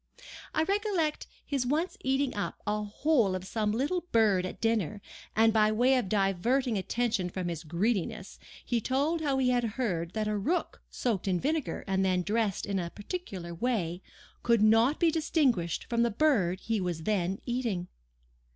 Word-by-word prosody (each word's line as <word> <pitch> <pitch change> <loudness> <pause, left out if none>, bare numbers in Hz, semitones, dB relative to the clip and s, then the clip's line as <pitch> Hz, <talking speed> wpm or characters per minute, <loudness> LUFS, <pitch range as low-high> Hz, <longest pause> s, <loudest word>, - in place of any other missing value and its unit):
I 315 - +3
recollect 390 -5 0 0.2
his 275 -3 -1
once 305 +8 0
eating 270 0 +1
up 205 - -3
the 210 0 -1
whole 220 -2 +2
of 185 0 -5
some 215 +1 -1
little 285 +11 0
bird 205 -5 +3
at - - -9
dinner, 215 -3 0 0.4
and 225 0 +5
by 215 -1 +4
way 245 +5 +3
of 245 -7 0
diverting 215 +6 +1
attention 205 -1 -1
from 180 0 -3
his 165 -1 -5
greediness, 200 +4 -2 0.3
he 235 -2 0
told 285 +8 0
how 280 -3 +1
he 255 -1 +2
had 245 -1 +2
heard 175 -9 -1
that 215 -1 -1
a 210 - 0
rook 295 - -1
soaked 220 -6 -2
in 180 -2 +1
vinegar 305 - -1
and 190 -1 +1
then 185 -1 +1
dressed 210 -1 0
in 200 -1 -1
a 170 -1 -3
particular 200 - -6
way, 180 -4 -1 0.4
could 235 -3 +3
not 225 +7 +4
be 335 -2 +4
distinguished 270 - +1
from 235 -1 0
the 235 - +3
bird 205 - +2
he 225 -2 -1
was 175 -3 -3
then 195 -2 0
eating. 235 -8 -2
220 Hz, 170 wpm, -29 LUFS, 190-260 Hz, 0.4 s, and